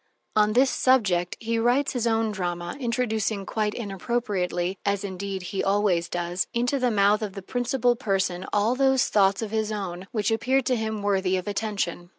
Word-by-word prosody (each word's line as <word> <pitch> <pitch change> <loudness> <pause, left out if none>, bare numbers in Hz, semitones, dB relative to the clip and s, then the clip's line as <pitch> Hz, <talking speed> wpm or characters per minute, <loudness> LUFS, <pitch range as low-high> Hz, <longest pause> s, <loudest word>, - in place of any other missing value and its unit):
On 210 0 +4
this 260 +3 +4
subject 190 -9 +2
he 230 0 -1
writes 250 +5 +2
his 240 -2 0
own 225 -1 +1
drama, 175 -3 -3
introducing 220 -5 -1
quite 210 0 -1
inappropriately 195 -4 -2
(as 200 0 0
indeed 195 -1 -4
he 195 - -1
always 195 -4 +1
does) 175 +1 -2
into 245 +4 +1
the 250 -1 +2
mouth 210 -1 +3
of 210 -3 -4
the 195 -1 -8
principal 245 +2 +1
person 190 -6 -1
all 210 +3 +2
those 265 -1 +2
thoughts 195 0 +3
of 215 - -5
his 220 -1 -1
own 190 -3 -5
which 210 -2 0
appeared 260 +4 +1
to 255 - +2
him 220 -2 -3
worthy 190 -2 +1
of 185 - -5
attention. 200 -5 -2
210 Hz, 175 wpm, -25 LUFS, 190-235 Hz, -, On